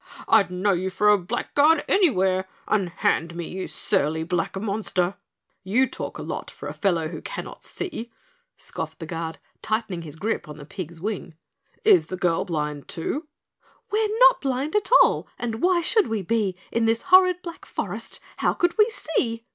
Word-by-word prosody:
"I'd 215 -5 +5
know 185 +3 +1
you 185 0 0
for 210 +3 +2
a 210 - +7
blackguard 285 - +2
anywhere. 190 - +3 0.2
Unhand 170 -3 0
me, 170 -1 -4
you 190 +1 -5
surly 160 -5 0
black 175 +2 -2
monster." 195 -3 -1 0.5
"You 220 +8 +3
talk - - -6
a - - -6
lot - - -5
for - - -9
a - - -5
fellow 170 -6 0
who - - -7
cannot - - -7
see," 275 -11 -5 0.5
scoffed - - -6
the 165 - -7
Guard, 165 0 -4 0.2
tightening 215 -5 -2
his 155 -3 -8
grip 195 -2 -2
on 150 - -8
the 145 - -10
pig's 170 +1 -7
wing. 190 -3 -4 0.5
"Is 405 -5 +6
the 185 - -5
girl 175 -2 +1
blind 150 -4 -3
too?" 290 - -3 0.6
"We're 430 0 +2
not - - +7
blind 275 +4 -1
at 415 -2 +2
all - - 0
and 230 -2 -4
why 360 -1 +3
should 435 +5 +2
we 220 -3 -2
be, 205 -1 0 0.2
In 230 -1 +1
this 225 0 +1
horrid 365 -1 +6
black 340 -1 -8
forest - - -5 0.2
how - - +1
could 350 +4 0
we 425 +2 +6
see?" 230 - -2
205 Hz, 175 wpm, -24 LUFS, 175-285 Hz, 0.6 s, a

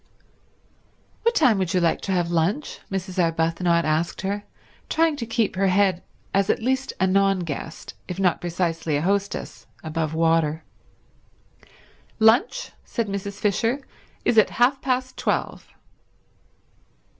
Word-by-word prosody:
"What 465 +1 +2
time 245 -10 +4
would 185 -1 -1
you - - +4
like 170 -2 +1
to 195 - -3
have 175 -2 0
lunch?" 175 - 0
Mrs. 190 -1 -2
Arbuthnot 165 +1 +1
asked 155 +2 0
her, 200 +2 -3 0.4
trying 325 -1 +2
to 230 -4 -4
keep 225 -3 0
her 195 +1 +2
head 190 -1 +2 0.3
as 195 +1 +2
at - - +2
least 265 +2 0
a 190 - +3
non 195 0 +3
guest, 160 -1 -6
if 180 0 -5
not 180 -3 +2
precisely 165 -3 -1
a 145 - -2
hostess, 200 +2 -2 0.2
above 160 -1 -2
water. 160 -1 +2 1.5
"Lunch," 245 - +3
said 230 -3 -3
Mrs. 200 0 -5
Fisher, 225 +5 +1 0.5
"is 225 - +5
at 215 - +4
half 255 +3 +3
past 255 -1 -1
twelve." - - -2
190 Hz, 135 wpm, -24 LUFS, 170-225 Hz, 1.5 s, is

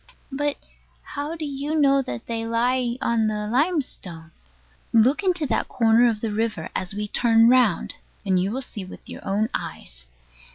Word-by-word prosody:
But 290 +1 -1 0.5
how 295 +3 -5
do 315 -2 -5
you 290 +2 -2
know 275 -1 +4
that 120 - -6
they 230 -1 -3
lie 240 +2 0
on 230 -2 +2
the 210 -1 -2
limestone? 240 - -1 0.6
Look 240 - +4
into 360 -5 +1
that 235 -5 0
corner 230 +1 +4
of 215 -2 -3
the 225 - -2
river, 215 -6 -2
as 185 +1 -3
we 210 0 -3
turn 230 +1 +4
round, 245 -8 +3 0.3
and 185 -2 +2
you 190 - 0
will 265 +4 -2
see 210 -5 -6
with 185 - -12
your - - -9
own 205 +3 0
eyes. - - -6
230 Hz, 170 wpm, -24 LUFS, 210-275 Hz, 0.6 s, know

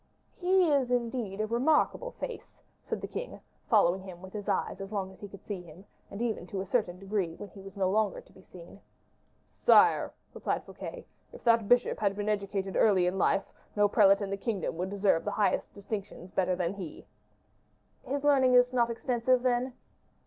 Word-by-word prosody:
"He 370 0 +3
is, 280 -5 +2
indeed, 235 -4 -1
a - - +1
remarkable 275 - +1
face," - - -8 0.2
said - - -4
the - - -4
king, - - -6 0.3
following 190 -4 +4
him 185 -2 -10
with 190 +1 -11
his 205 -2 -5
eyes - - -1
as 195 +1 -7
long 195 -3 -3
as 190 - -17
he 205 - -6
could 195 0 -13
see 200 -4 -4
him, 175 +3 -14 0.2
and 200 +4 -5
even 220 -6 -2
to 195 - -4
a 190 - -3
certain 190 -5 0
degree 195 -3 -2
when 205 - -9
he 195 - -13
was 195 +1 -11
no 190 -1 +2
longer 205 +1 +1
to - - -18
be 190 - -16
seen. 180 +1 -14 0.7
"Sire," - - +4 0.2
replied - - -2
Fouquet, - - -8 0.3
"if - - -13
that 230 -3 +3
bishop 245 0 +3
had 200 -2 +1
been 205 +1 -2
educated 200 -2 -2
early 190 -5 +4
in 180 +2 -1
life, 195 - +2 0.3
no 205 0 +4
prelate 200 -1 +5
in 200 -1 -3
the 200 - -1
kingdom 200 -5 -2
would 180 +2 -2
deserve 195 -4 +2
the - - -2
highest 210 - 0
distinctions 200 -3 -6
better 185 -1 +1
than 180 0 -1
he." 185 -6 -8 1.0
"His 280 +1 -3
learning 265 -3 +4
is 250 0 +5
not 240 -2 +2
extensive, 245 +1 +1
then?" 250 0 +1
205 Hz, 195 wpm, -30 LUFS, 190-240 Hz, 1.0 s, prelate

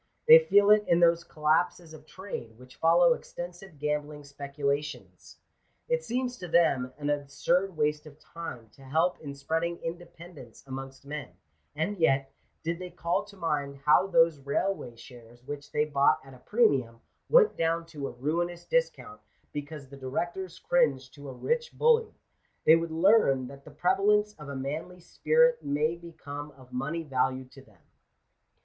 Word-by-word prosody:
They 475 +1 +11
feel 205 - +4
it 210 0 +6
in 170 - +4
those 170 0 +4
collapses 160 +2 0
of 155 0 -14
trade, 155 - -8
which 125 +1 -15
follow 170 +1 +5
extensive 175 0 -9
gam 150 0 -1
bling 150 -1 -10
speculations. 140 +1 -4 0.5
It 485 0 0
seems 250 0 -2
to 180 - -7
them 160 -7 +2
an 145 0 -1
absurd 145 +6 0
waste 150 0 0
of 145 -1 -14
time 140 -9 -9
to 135 - -20
help 160 +7 0
in 140 -2 -8
spreading 165 +4 -2
independence 170 -6 -9
amongst 135 0 -8
men; 145 -2 -7 0.4
and 175 +6 -2
yet, 135 -4 +2 0.3
did 170 +1 -2
they 180 0 -6
call 170 +2 -2
to 200 -1 -15
mind 145 -5 -2
how 175 +5 +5
those 165 -4 +3
railway 140 -1 -2
shares, 120 0 -15
which 145 +1 -8
they 150 0 +1
bought 140 -2 +3
at 135 - -13
a 130 - -15
premium, 130 - +1 0.3
went 470 -2 +5
down 165 0 0
to 150 -4 -6
a - - -6
ruinous 170 +7 -2
discount - - -1 0.3
because 145 -1 -7
the 140 - -11
directors 170 +7 -4
cringed 140 -7 +1
to 140 -1 -10
a - - -6
rich 475 - -2
bully, 460 -1 +3 0.5
they 160 - +8
would 165 0 -1
learn 160 - +3
that 140 0 -13
the - - -11
pre 155 +5 +1
valence 210 +2 +2
of 150 -2 -9
a 140 - -5
manly 155 +7 -5
spirit 480 - +2
may 150 +3 0
become 155 -4 -9
of 125 -1 -17
money 150 +6 -3
value 130 -2 -1
to 135 - -14
them. 110 -9 -24
155 Hz, 165 wpm, -28 LUFS, 140-175 Hz, 0.5 s, They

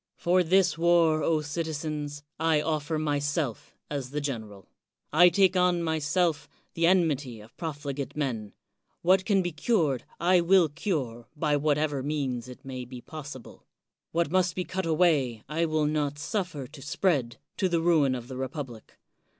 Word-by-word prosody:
For 180 +2 +3
this 180 -1 +3
war, 165 -2 +4
O 160 -1 +2
citi 160 +2 -3
zens, 145 -1 -4 0.2
I 160 -1 +3
offer 155 0 -1
myself 145 -3 -2
as 140 -3 -4
the 145 +2 -3
general 110 -9 -5 0.5
I 175 +3 +8
take 190 +2 +3
on 180 -1 +3
myself 160 -1 0 0.2
the 165 0 +2
enmity 150 -10 +1
of 110 +2 -15
profligate 145 -4 -5
men. 115 -8 -2 0.5
What 185 +2 +4
can 195 -3 +3
be 175 - -2
cured, 155 - +1 0.2
I 180 +1 +4
will 175 -1 +5
cure, 140 - -3
by 150 -1 +1
whatever 150 -1 +1
means 130 -4 -2
it 125 +1 -12
may 130 -1 -5
be 125 0 -9
possible. 145 -2 -10 0.4
What 170 -2 0
must 185 -1 +2
be 185 - -1
cut 185 0 -3
away, 150 -9 +2
I 160 +4 0
will 155 -1 +1
not 150 -1 -1
suffer 155 -2 -3
to 135 +3 -13
spread, 145 -4 0 0.2
to 190 - +1
the 170 -1 +1
ruin 160 -6 +3
of 120 -1 -7
the 130 -1 -7
republic. 130 -4 -6
150 Hz, 160 wpm, -28 LUFS, 140-170 Hz, 0.5 s, I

